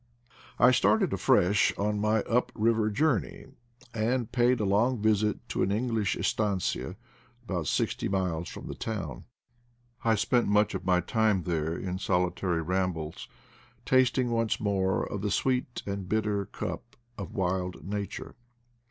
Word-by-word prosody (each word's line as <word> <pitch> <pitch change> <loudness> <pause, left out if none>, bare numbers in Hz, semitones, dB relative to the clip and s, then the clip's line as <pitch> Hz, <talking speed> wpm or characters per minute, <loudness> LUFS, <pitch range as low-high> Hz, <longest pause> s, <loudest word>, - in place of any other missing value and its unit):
I 125 +1 +6
started 190 - +3
afresh 100 -6 +3
on 105 +1 0
my 110 0 +2
up 125 +3 0
river 110 -1 +2
journey, 105 - 0 0.5
and 115 +1 0
paid 125 0 +3
a 105 - 0
long 110 +5 +2
visit 105 0 +1
to - - -1
an 95 - +1
English 110 -2 0
estanoia 95 - -1 0.5
about 90 -8 -3
sixty - - 0
miles 90 -4 -1
from - - -9
the - - -5
town. 110 -4 -5 0.8
I 115 -1 +3
spent 120 +3 +2
much 105 +1 +3
of 95 -1 -4
my 90 -1 +3
time 110 -4 +1
there 80 -1 -1
in 90 0 -4
solitary 90 -2 0
rambles, 90 -3 -2 0.6
tasting 130 -1 +3
once 115 -1 0
more 95 -3 0
of 100 - -5
the 105 - -1
"sweet 125 +1 -1
and 100 -2 -4
bitter 105 -2 0
cup 125 +3 -6 0.2
of 100 - -7
wild 90 -1 -2
Nature.' 100 0 -5
105 Hz, 145 wpm, -28 LUFS, 95-115 Hz, 0.8 s, I